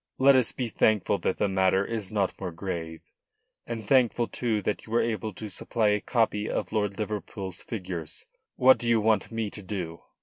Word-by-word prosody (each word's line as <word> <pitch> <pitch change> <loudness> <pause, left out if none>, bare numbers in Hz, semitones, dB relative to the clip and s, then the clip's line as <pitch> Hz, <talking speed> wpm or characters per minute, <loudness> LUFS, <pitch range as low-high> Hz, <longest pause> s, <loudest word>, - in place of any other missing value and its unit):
Let 135 +1 +6
us 125 -3 +4
be 125 - -3
thankful 105 -2 +2
that - - -1
the 105 - +2
matter 95 0 +2
is 110 -3 -4
not 100 -3 +1
more 90 -2 -3
grave, 80 -2 -5 0.7
and 115 -3 -5
thankful, 120 -2 +3
too, 115 -3 -1
that 105 - -2
you - - -11
were 115 - +3
able 110 -1 -2
to 110 - -6
supply 110 +1 0
a 105 0 +1
copy 110 -3 +1
of - - -2
Lord 105 -2 -1
Liverpool's 100 -3 -4
figures. 90 -7 -5 0.3
What 130 +1 +6
do 120 - -1
you 115 -1 +4
want 110 -1 +2
me 115 -2 -2
to 105 - -8
do?" 90 -4 -5
105 Hz, 195 wpm, -27 LUFS, 95-115 Hz, 0.7 s, Let